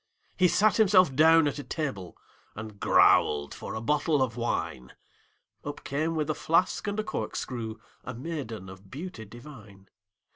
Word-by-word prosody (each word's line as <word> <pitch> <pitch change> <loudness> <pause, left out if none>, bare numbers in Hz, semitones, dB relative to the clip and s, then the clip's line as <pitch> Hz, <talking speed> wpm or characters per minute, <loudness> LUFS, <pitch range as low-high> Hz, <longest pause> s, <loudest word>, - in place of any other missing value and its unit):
He 185 - +4
sat 210 +5 +3
himself 185 -9 +5
down 160 +1 +6
at 145 - -3
a - - -5
table, 135 - -5 0.4
And 110 -1 -8
growled 75 -1 +4
for - - -7
a 110 - -4
bottle 150 +3 +1
of 120 -3 -3
wine; 90 - -3 0.7
Up - - -7
came 155 +4 -1
with 155 -2 -1
a - - 0
flask 180 +6 +1
and 205 +1 -2
a - - 0
corkscrew 115 - -4 0.3
A - - -7
maiden 125 - -6
of 95 +1 -13
beauty 145 - -7
divine. 105 -4 -14
140 Hz, 155 wpm, -28 LUFS, 110-165 Hz, 0.7 s, down